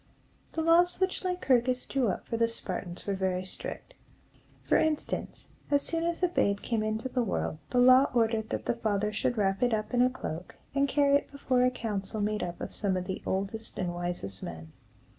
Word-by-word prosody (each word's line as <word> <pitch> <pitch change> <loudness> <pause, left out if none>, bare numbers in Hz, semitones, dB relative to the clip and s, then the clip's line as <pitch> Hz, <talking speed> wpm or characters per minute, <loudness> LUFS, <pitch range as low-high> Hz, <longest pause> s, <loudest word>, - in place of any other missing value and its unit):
The 320 - -1
laws 345 +2 +4
which 375 0 0
Lycurgus 255 -9 +1
drew 265 -3 0
up 190 - -2
for 230 - -3
the 230 0 +3
Spartans 185 -5 -3
were 200 - 0
very 185 -1 -1
strict. 345 - -6 0.7
For - - +2
instance, 310 -1 -1 0.2
as 285 -1 +3
soon 330 0 0
as 340 +1 -1
a - - +6
babe 200 - +1
came 230 -3 0
into 215 +3 -1
the 255 -1 -1
world, 190 -7 -2
the 250 - -1
law 255 +2 +7
ordered 225 -1 +1
that - - -3
the - - +1
father 210 -2 0
should 240 +3 0
wrap 195 -2 +1
it 245 -2 +3
up 215 +3 -4
in 245 - +4
a 250 - +5
cloak, 180 -9 -6 0.2
and 280 0 +2
carry 280 0 +4
it - - -8
before 265 -3 +1
a 250 - +5
council 215 -4 -3
made 210 +1 0
up 175 -1 -4
of - - -6
some 195 -3 0
of 180 - -3
the 190 +1 -4
oldest 200 +4 -2
and 180 -2 -2
wisest 175 - -3
men. 80 -1 -7
225 Hz, 205 wpm, -29 LUFS, 195-265 Hz, 0.7 s, law